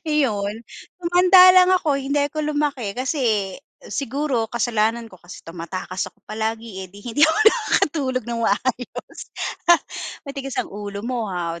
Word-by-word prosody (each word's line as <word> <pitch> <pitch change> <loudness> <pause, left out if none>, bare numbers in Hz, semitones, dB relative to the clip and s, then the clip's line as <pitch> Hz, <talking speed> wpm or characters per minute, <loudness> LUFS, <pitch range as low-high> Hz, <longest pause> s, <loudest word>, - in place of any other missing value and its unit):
Iyon, 225 -7 0 0.3
tumanda 365 +1 +7
lang 365 0 +6
ako, 295 -6 0
hindi 275 +2 -2
ako 305 +2 -3 0.2
lumaki 265 -9 -1
kasi 240 -7 0 0.4
siguro 270 -4 -1
kasalanan 230 -1 0
ko 185 - -15
kasi 175 +1 -12
tumatakas 180 +2 -5
ako - - -34
palagi, 220 -1 -4
eh. 190 - -7
'Di 200 +3 -15
hindi 245 +4 -3
ako 320 - +1
nakakatulog 295 - +2
ng 235 -1 -4
maayos. 240 +3 -2 1.1
Matigas 275 -2 -6
ang - - -3
ulo 205 0 -6
mo 240 -3 -2
ha, 170 -2 -4
235 Hz, 140 wpm, -22 LUFS, 205-285 Hz, 1.1 s, tumanda